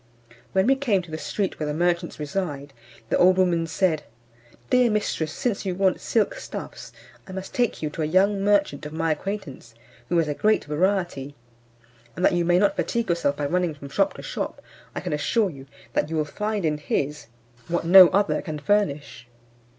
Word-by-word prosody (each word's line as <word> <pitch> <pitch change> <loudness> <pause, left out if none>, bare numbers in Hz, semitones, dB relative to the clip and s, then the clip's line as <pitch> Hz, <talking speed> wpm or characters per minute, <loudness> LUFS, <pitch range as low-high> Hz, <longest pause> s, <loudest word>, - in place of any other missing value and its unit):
When 190 0 +3
we 265 - +5
came 230 -9 +1
to 170 - -13
the 155 - -3
street 200 +3 -3
where 155 - -2
the 150 - -2
merchants 175 +1 0
reside, 145 -3 -4 0.4
the - - +1
old 185 +1 +5
woman 175 -3 +2
said, 165 -2 +1 0.7
"Dear 250 -1 +5
mistress, 205 -7 -1
since 230 +2 -2
you 185 -3 -2
want 190 0 +1
silk - - +1
stuffs, - - -8 0.4
I 190 - -9
must 190 0 -7
take 240 -8 0
you 150 - -2
to 160 - -5
a - - +1
young 195 +5 +2
merchant 200 -8 +1
of 150 - -10
my 160 0 0
acquaintance, 155 - -5 0.3
who 175 - +1
has 165 -2 +2
a 150 - -1
great 215 +8 +1
variety; 155 -3 -1 0.8
and 180 - 0
that - - +4
you 175 0 +1
may 175 +1 +3
not 200 +2 +3
fatigue 235 -3 -1
yourself 145 -5 +1
by 145 - -2
running 175 +1 0
from 140 -1 -10
shop - - +1
to - - -9
shop, - - -4 0.4
I - - -3
can - - -3
assure 195 +7 +1
you 135 -2 -12 0.3
that - - 0
you 165 - -3
will 155 -1 +1
find 210 +4 -3
in 150 -1 0
his 145 0 -2 0.4
what 170 0 -1
no 185 +1 +10
other 200 +3 +1
can 155 -3 -5
furnish." 145 -7 -1
175 Hz, 195 wpm, -24 LUFS, 150-195 Hz, 0.8 s, no